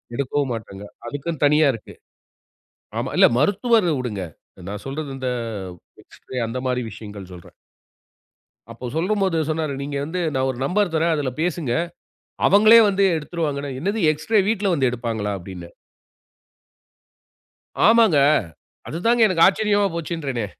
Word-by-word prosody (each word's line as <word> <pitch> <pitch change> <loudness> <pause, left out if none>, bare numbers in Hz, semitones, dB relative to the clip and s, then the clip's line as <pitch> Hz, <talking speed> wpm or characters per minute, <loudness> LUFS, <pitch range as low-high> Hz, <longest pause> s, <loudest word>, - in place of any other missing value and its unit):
எடுக்கவும் 140 0 -1
மாட்டாங்க. 100 -3 -8 0.2
அதுக்குன்னு 145 +4 -4
தனியா 150 +1 +4
இருக்கு. 115 - -10 1.1
ஆமா. - - -3
இல்ல - - +7
மருத்துவர 205 - +2
விடுங்க. 110 -6 -4 0.5
நான் 105 0 -6
சொல்றது 140 +1 -5
இந்த 130 -1 -4 0.8
எக்ஸ்ரே 130 - -11
அந்தமாரி 125 +1 -2
விஷயங்கள் 100 -3 -10
சொல்றேன். 85 -2 -14 1.2
அப்போ 115 +2 -9
சொல்லும்போது 190 +1 0
சொன்னாரு, 155 -2 -1
நீங்க 140 0 -4
வந்து 180 +4 -3
நான் 130 0 +1
ஒரு 125 - -10
நம்பர் 190 +2 0
தர்றேன். 165 +1 +2
அதில 140 -4 -2
பேசுங்க. 165 -7 -1 0.7
அவங்களே 215 +4 +7
வந்து 200 0 +1
எடுத்துருவாங்கன்னா, 150 -3 -3
என்னது 200 +6 -1
எக்ஸ்ரே 155 +9 +1
வீட்ல 205 -3 0
வந்து 135 -6 +2
எடுப்பாங்களா! 115 -4 -3
அப்பிடின்னேன். 90 -2 -10 2.1
ஆமாங்க. 225 -7 +5 0.7
அதுதாங்க 230 +9 +1
எனக்கு 175 -4 +4
ஆச்சரியமா 205 0 +2
போச்சுன்றேனே! 150 -8 -3
150 Hz, 120 wpm, -22 LUFS, 125-185 Hz, 2.1 s, இல்ல